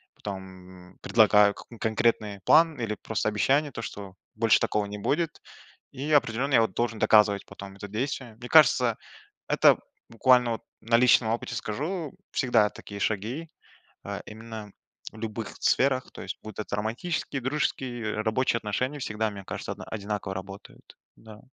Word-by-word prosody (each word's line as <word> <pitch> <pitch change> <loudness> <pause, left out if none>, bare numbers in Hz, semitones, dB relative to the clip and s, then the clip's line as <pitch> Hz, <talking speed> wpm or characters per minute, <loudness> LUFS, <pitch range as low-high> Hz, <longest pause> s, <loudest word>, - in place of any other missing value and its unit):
потом, 95 -2 -9
м, - - -24
предлагаю 105 -2 +5
к - - -12
конкретный 110 -2 0
план 160 -3 +5
или 115 -2 -2
просто 110 0 -2
обещание, 140 +8 +2
то 115 - -6
что 100 -3 -7 0.2
больше 110 0 +4
такого 105 -1 0
не 100 +1 -6
будет, 155 +8 -1 0.5
и 140 +3 -4
определенно 135 -1 +2
я 115 - +6
вот 110 -4 0
должен 115 -2 -1
доказывать 105 -2 +4
потом 100 0 -10
это 100 +1 -8
действием. 120 +1 -4
Мне 125 - -8
кажется, 125 -7 +5 0.5
это - - +5 0.3
буквально 125 +1 +4
вот 115 - -5 0.2
на 115 +1 +3
личном 120 -1 +5
опыте 115 - -3
скажу, 155 - -4 0.2
всегда 115 -5 +3
такие 100 -1 -10
шаги, 115 +12 -2 0.5
э, - - -5
именно 110 -1 -9 0.4
в 110 - -13
любых 110 0 -5
сферах, 130 -1 +2
то - - -10
есть - - -6
будут 110 0 -7
романтические, 120 +8 -2
дружеские, 130 -3 -2 0.2
э, - - 0
рабочие 115 +2 +1
отношения 125 +7 -2
всегда, 110 -3 -2
мне 100 -1 -9
кажется, - - -5
одна - - -8
одинаково 105 -2 -4
работают, 95 +1 -10 0.2
да. 110 -1 -14
110 Hz, 155 wpm, -27 LUFS, 105-130 Hz, 0.5 s, я